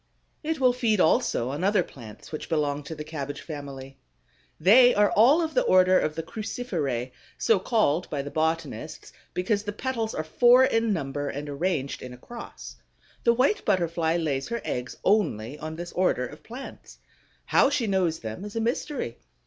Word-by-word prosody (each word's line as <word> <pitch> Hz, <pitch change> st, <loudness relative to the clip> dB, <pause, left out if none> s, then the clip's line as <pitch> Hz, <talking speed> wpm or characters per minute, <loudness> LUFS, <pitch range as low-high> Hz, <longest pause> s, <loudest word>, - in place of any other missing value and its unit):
It 315 Hz, -1 st, -2 dB
will 255 Hz, -2 st, +4 dB
feed 230 Hz, -5 st, +1 dB
also 130 Hz, -7 st, +2 dB
on 145 Hz, +6 st, -4 dB
other 200 Hz, -1 st, +3 dB
plants 115 Hz, -9 st, -12 dB
which 155 Hz, -, -6 dB
belong 150 Hz, -3 st, 0 dB
to 160 Hz, -, -6 dB
the 150 Hz, -, -6 dB
cabbage 145 Hz, -2 st, -6 dB
family. 135 Hz, -3 st, -8 dB, 0.6 s
They 245 Hz, +9 st, +7 dB
are 205 Hz, 0 st, +4 dB
all 275 Hz, +11 st, +5 dB
of 320 Hz, -, -3 dB
the -, -, +3 dB
order 185 Hz, -, +5 dB
of 155 Hz, -, -1 dB
the 165 Hz, -, -3 dB
Cruciferæ, 160 Hz, -, -3 dB, 0.3 s
so 220 Hz, -4 st, +3 dB
called 185 Hz, -, +1 dB
by 145 Hz, -2 st, -2 dB
the 145 Hz, -, -7 dB
botanists 160 Hz, 0 st, -3 dB, 0.2 s
because 200 Hz, +3 st, 0 dB
the 205 Hz, 0 st, -4 dB
petals 225 Hz, 0 st, -3 dB
are 155 Hz, -, -2 dB
four 240 Hz, +10 st, +5 dB
in 225 Hz, -3 st, +1 dB
number 145 Hz, -5 st, -2 dB
and 145 Hz, +2 st, -5 dB
arranged 145 Hz, -1 st, -2 dB
in 125 Hz, -1 st, -8 dB
a -, -, -11 dB
cross. 235 Hz, -, -10 dB, 0.5 s
The 235 Hz, -, +6 dB
White 270 Hz, -, +2 dB
Butterfly 170 Hz, -4 st, +1 dB
lays 140 Hz, -5 st, -1 dB
her 235 Hz, -, -3 dB
eggs 125 Hz, 0 st, -4 dB
only 150 Hz, -, +1 dB
on 155 Hz, +1 st, -6 dB
this 175 Hz, +1 st, -7 dB
order 180 Hz, -8 st, +1 dB
of 145 Hz, +5 st, -11 dB
plants. 250 Hz, +4 st, -10 dB, 0.5 s
How -, -, +4 dB
she 280 Hz, -4 st, 0 dB
knows 185 Hz, -5 st, +1 dB
them 110 Hz, -, -6 dB
is 210 Hz, +1 st, -8 dB
a -, -, 0 dB
mystery. 235 Hz, -, -2 dB
170 Hz, 180 wpm, -26 LUFS, 145-225 Hz, 0.6 s, They